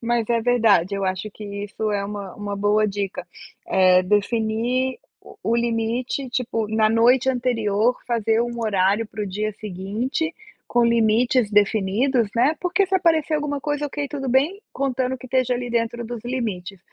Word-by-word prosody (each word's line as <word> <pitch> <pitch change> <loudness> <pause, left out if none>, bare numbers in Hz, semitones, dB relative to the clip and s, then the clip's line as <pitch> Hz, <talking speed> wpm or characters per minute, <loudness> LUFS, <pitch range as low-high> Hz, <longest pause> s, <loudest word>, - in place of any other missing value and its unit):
Mas 235 -1 0
é 235 -1 +1
verdade, 220 -6 +3
eu 195 0 -2
acho 185 +3 -3
que 215 - -12
isso 205 +1 -4
é 200 -1 -1
uma 200 -2 -6
uma 205 -1 -5
boa 205 +2 +2
dica, 200 -3 -4 0.4
eh, 185 -1 +4
definir 225 +6 0
o - - -40 0.3
o 230 - +1
limite, 235 +3 -1
tipo, 230 -3 -2
na 220 0 +2
noite 245 +3 +4
anterior 235 -2 +1
fazer 225 -1 +1
um 240 0 -4
horário 205 0 +1
para 215 -1 -5
o - - -3
dia 210 +3 -2
seguinte 215 - -3 0.3
com 240 0 +3
limites 235 0 +3
definidos, 210 +4 +2
né. 265 +7 +3
Porque 370 +2 +2
se 385 - -2
aparecer 330 -4 +2
alguma 295 -1 -1
coisa, 295 +1 -2
ok, 290 0 -4
tudo 275 -2 -5
bem, 285 +11 +2
contando 260 -1 -1
que 255 - -15
esteja 255 -1 +1
ali 245 0 -4
dentro 235 0 -1
dos 235 -1 -6
limites. 205 -7 -4
230 Hz, 165 wpm, -22 LUFS, 205-255 Hz, 0.4 s, eh